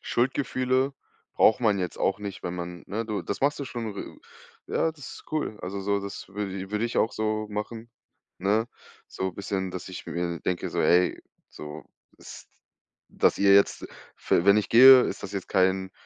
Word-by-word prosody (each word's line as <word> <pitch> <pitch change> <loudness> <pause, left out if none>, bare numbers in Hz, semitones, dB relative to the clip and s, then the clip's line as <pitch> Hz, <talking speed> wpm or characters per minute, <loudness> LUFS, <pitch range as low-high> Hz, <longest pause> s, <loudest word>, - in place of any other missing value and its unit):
Schuldgefühle 130 +1 0 0.4
braucht 110 - +4
man 105 -4 +2
jetzt 90 -1 -4
auch 95 - +1
nicht, 100 -2 -7
wenn 90 - -4
man 90 0 -6
ne? 110 +4 -3
Du, 105 -2 -3
das 100 - -5
machst 145 +2 +2
du 140 - -4
schon 115 -4 -5
r - - -8 0.5
ja, 165 - 0
das 145 -4 -13
ist - - -13
cool. 150 -9 -2
Also, 95 +2 -5
so, 100 +1 0
das 100 0 -7
würde 100 0 -4
i 95 +1 -7
würde 105 +2 -1
ich 120 - -5
auch 110 - +2
so 110 0 -2
machen, 110 +2 -6 0.5
ne? 105 +4 +1 0.4
So 95 0 -4
bisschen, 95 0 -3
dass 90 +1 -7
ich 90 - -8
mir 85 -1 -3
denke, 90 -1 -2
so: - - -1
„Ey, 90 +1 +3 0.3
so, 75 -1 -9 0.3
ist - - -12 0.6
dass - - +2
ihr 100 0 +5
jetzt, 100 - +3 0.3
f - - -16
wenn 100 +1 +6
ich 105 - 0
gehe, 130 +2 +9
ist - - -4
das - - -7
jetzt 100 -2 -5
kein 95 0 +1
100 Hz, 190 wpm, -26 LUFS, 95-115 Hz, 0.6 s, gehe